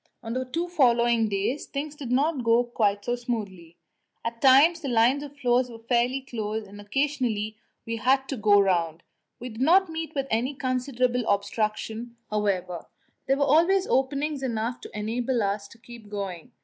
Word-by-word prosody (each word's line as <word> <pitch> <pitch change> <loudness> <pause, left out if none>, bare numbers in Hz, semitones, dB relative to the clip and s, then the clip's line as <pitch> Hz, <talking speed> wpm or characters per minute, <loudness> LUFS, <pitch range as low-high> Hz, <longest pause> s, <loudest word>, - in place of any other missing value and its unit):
On 225 0 -4
the 255 +1 -2
two 335 +7 -3
following 240 -8 +3
days 200 +8 -2
things 290 +1 -4
did 270 -5 -6
not 275 +1 +1
go 230 +1 +4
quite 205 -4 0
so 240 - 0
smoothly; 205 -9 -5 0.5
at 230 0 -4
times 285 +6 +6
the 280 - -4
lines 245 +3 +3
of 290 0 -9
floes 250 -2 +2
were 230 - -9
fairly 240 +3 0
close, 220 -4 -4
and 205 +1 -11
occasionally 230 -3 -1 0.3
we 230 0 -3
had 265 +4 +2
to 275 - -2
go 205 -3 +4
round. 170 -4 +1 0.4
We 250 - -6
did 220 +1 -8
not 360 +6 +5
meet 320 -1 -5
with 275 -1 0
any 245 +6 0
considerable 255 -1 0
obstruction, 220 +3 -2 0.2
however; 185 -5 -1 0.4
there 270 +1 +2
were 285 - +2
always 340 +7 +4
openings 280 +1 0
enough 235 -1 -2
to - - -9
enable 235 +3 -1
us 200 0 -2
to 230 - -17
keep 230 -2 -13
going. 195 -5 -6
240 Hz, 175 wpm, -26 LUFS, 215-270 Hz, 0.5 s, times